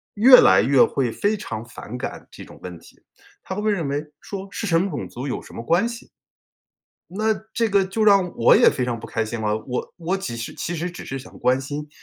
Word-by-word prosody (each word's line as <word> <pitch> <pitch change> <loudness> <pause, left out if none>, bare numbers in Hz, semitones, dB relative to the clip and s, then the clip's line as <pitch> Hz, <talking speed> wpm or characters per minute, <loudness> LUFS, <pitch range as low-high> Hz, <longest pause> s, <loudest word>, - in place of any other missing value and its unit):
越 250 +5 +8
来 95 +1 +6
越 130 +3 +5
会 125 -4 0
非 205 - 0
常 115 - -6
反 120 +1 -9
感 - - -6
这 - - -11
种 - - -15
问 90 -2 -8
题， - - -20 0.4
他 190 - -6
会 210 - -4
会 215 - +2
认 170 -8 -1
为 145 +2 -2 0.2
说： 195 -1 -7
“是 220 - -4
什 165 -1 +3
么 195 +1 -1
种 - - -5
族 130 +4 -6
有 125 - -3
什 - - -14
么 115 - -6
关 175 - +2
系？” 235 +1 -9 1.0
那 215 +3 +1 0.2
这 230 -2 +1
个 195 -1 +3
就 215 +3 -1
让 195 -4 +4
我 115 - +5
也 - - +6
非 125 - 0
常 120 -2 -3
不 - - -8
开 115 - -2
心 110 +1 -5
了， 105 0 0
我 125 -1 -4
我 175 +2 -2
几 155 -12 -5
是 115 - -6
其 175 - -4
实 175 +3 -3
只 175 - -9
是 135 - -4
想 130 - -13
关 125 +1 +2
心 145 +2 -6
160 Hz, 260 characters per minute, -22 LUFS, 125-200 Hz, 1.0 s, 越